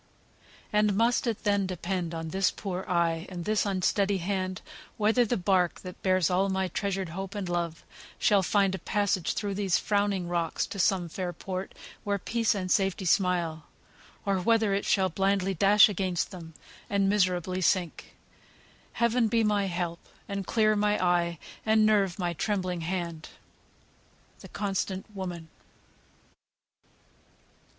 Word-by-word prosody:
"And 210 -1 +3
must 235 +3 +2
it 225 -3 -2
then 200 -2 +1
depend 180 -1 -3
on 165 0 -4
this 190 +2 +2
poor 190 -2 -5
eye 170 -1 0
And 175 -3 -6
this 215 -1 +1
unsteady 195 +1 +1
hand, 185 0 -3 0.3
whether 220 +3 +3
the 240 +2 0
bark, 180 -2 +1
That 180 -1 -10
bears 185 -3 +2
my - - +2
all 190 +1 +1
of 190 -1 -1
treasured 195 -3 -2
hope 190 +4 -6
and 200 -3 -3
love, 170 -2 -2 0.3
Shall 205 -2 +3
find 195 0 +2
a 190 - -3
passage 200 -4 0
through 205 -2 -2
these 195 -2 +1
frowning 200 -3 0
rocks 170 -1 -1
To 200 - -7
some 185 -1 +2
fair 180 +2 -4
port 185 +2 -6 0.3
where 200 0 0
peace 225 +3 0
and 185 -2 -3
safety 195 -1 +1
smile, 170 -4 +1 0.6
Or 195 -2 +1
whether 220 +1 +2
it 200 - -1
shall 190 -2 +2
blindly 195 +2 +1
dash 200 +3 +6
against 190 -3 -2
them, 165 -4 -10 0.3
And 200 -1 +2
miserably 185 -2 +1
sink? 180 -2 0 0.8
Heaven 235 0 +2
be 230 0 +2
my 205 -2 +2
help; 175 -2 -3 0.3
And 200 -2 -4
clear 215 -2 +3
my 210 0 +2
eye, 175 -1 +1 0.3
and 220 0 +4
nerve 200 -4 +2
my 175 -3 -1
trembling 185 -1 -2
hand!" 170 -2 -4 1.1
"THE - - -12
CONSTANT 195 0 -3
WOMAN." 175 -4 -6
190 Hz, 150 wpm, -28 LUFS, 175-205 Hz, 1.1 s, dash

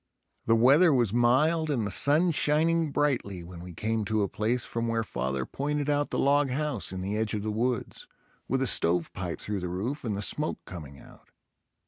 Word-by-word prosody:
The 115 - +5
weather 140 +9 +5
was 120 -7 +2
mild 150 +7 +2
and 125 -7 0
the 105 - -3
sun 150 - +4
shining 160 +1 +1
brightly 125 -12 -1
when 85 0 -10
we 90 0 -9
came 110 +3 -1
to 110 0 0
a - - 0
place 115 +5 -1
from 115 0 -3
where 115 0 0
father 65 - -3
pointed 145 +1 -2
out 145 0 0
the - - -3
log 140 0 +3
house 140 -6 -2
in 95 0 -5
the 100 +3 -3
edge 110 0 -1
of 105 - -3
the 110 - -2
woods, 120 +2 -3 0.4
with 135 0 0
a - - +1
stovepipe 90 -3 +1
through 105 -1 -4
the 90 -1 -4
roof 110 +11 -4
and 110 -5 -2
the 100 - -1
smoke 150 +8 0
coming 75 -6 -9
out. - - -17
115 Hz, 200 wpm, -28 LUFS, 100-145 Hz, 0.4 s, The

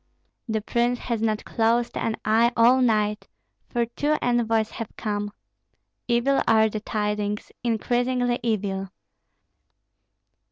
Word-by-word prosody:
"The 220 -1 -1
prince 240 +3 0
has 235 -2 -3
not 215 -1 0
closed 235 +1 +1
an 225 - -1
eye 225 +2 +4
all 245 +3 +5
night, 210 -3 +1 0.4
for 240 -1 0
two 290 +6 -1
envoys 225 -2 +1
have 230 - -6
come. 205 -1 -2 0.8
Evil 245 +3 +2
are 220 -1 +5
the 215 - -4
tidings, 210 -1 -2
increasingly 245 +2 0
evil. 200 -4 -2
225 Hz, 115 wpm, -24 LUFS, 215-240 Hz, 0.8 s, all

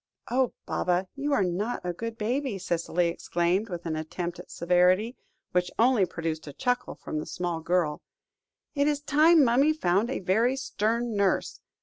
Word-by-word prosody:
"Oh, 255 0 +2
Baba, 180 +1 0
you 285 +1 -2
are 245 -8 +3
not 190 +7 -2
a 175 - -1
good 230 +5 -6
baby," 245 +1 -1
Cicely 170 -1 0
exclaimed, 175 +5 0
with 175 -2 -6
an 160 -1 -2
attempt 170 +3 -4
at - - -11
severity, 180 +7 +2 0.4
which 180 0 +1
only 230 -5 +4
produced 160 -2 -4
a 145 - -7
chuckle 245 - -1
from 155 - -5
the - - -5
small 175 -2 -3
girl; 165 -2 0 0.7
"it 285 -1 +1
is 295 -1 +1
time 305 +2 +5
mummy 270 +5 +4
found 205 - +1
a 265 - -2
very 220 +8 +2
stern 235 -2 -1
nurse. 200 -1 0
200 Hz, 165 wpm, -27 LUFS, 175-250 Hz, 0.7 s, time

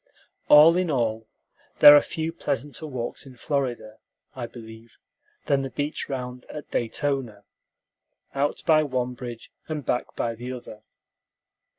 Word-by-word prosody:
All 155 +3 +8
in 180 -2 0
all, 115 -5 -1 0.5
there 145 - +10
are 145 - +7
few 160 0 -4
pleasanter 145 +3 -4
walks 130 -1 -5
in 130 - -13
Florida, 120 -5 -3 0.3
I 125 -3 -5
believe, 115 -1 -13 0.5
than 140 -1 +2
the 135 - -4
beach 145 +3 -4
round 125 -2 -5
at 150 - -9
Daytona, 120 -3 -2 0.9
out 140 +1 -1
by 155 -2 +5
one 130 -4 -2
bridge 120 -2 -9 0.2
and 150 -4 -5
back 125 - -2
by 115 - -2
the 120 +3 -7
other. 115 -3 -10
130 Hz, 135 wpm, -25 LUFS, 120-145 Hz, 0.9 s, there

